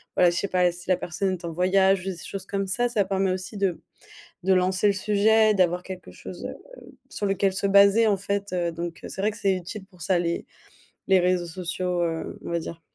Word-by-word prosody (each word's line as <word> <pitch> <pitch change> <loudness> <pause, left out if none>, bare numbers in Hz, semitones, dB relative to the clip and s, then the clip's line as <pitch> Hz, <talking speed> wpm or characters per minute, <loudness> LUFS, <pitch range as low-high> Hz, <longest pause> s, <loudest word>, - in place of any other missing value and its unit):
voilà, 180 -1 +5
je 170 - -2
sais 200 - 0
pas 180 -1 +2
si 180 +1 -12
la 185 - +5
personne 185 +2 -2
est 175 -1 -7
en 165 - -3
voyage 190 +2 +3
ou - - -10
j 195 - -3
des 175 - -8
choses 195 -1 -6
comme 195 -1 -2
ça 245 +6 +1
ça 215 -4 +2
permet 190 -1 0
aussi 185 +3 -5
de 190 -4 -1 0.6
de 190 0 +3
lancer 185 +2 +2
le 200 - +4
sujet, 215 +2 +3
d'avoir 180 -2 +2
quelque 185 -1 -9
chose, - - -9
heu, - - -7 0.5
sur 205 - -3
lequel 195 0 +1
se 195 +1 -1
baser, 200 +3 +6
en 200 -2 +2
fait, 200 0 -3
heu. 170 -1 0
Donc, 170 0 -6
heu, - - -7
c'est 190 - -5
vrai, 210 - +2
que 215 - -11
c'est 195 -1 +2
utile 185 +3 -7
pour 180 -3 -19
ça, 180 +2 +2
les 170 0 -2 0.6
les 190 -1 +6
réseaux 180 -1 +1
sociaux, 180 +1 -2
heu, 165 -1 -3
on - - -5
va 170 - 0
dire. 165 +1 -8
185 Hz, 240 wpm, -25 LUFS, 180-200 Hz, 0.6 s, baser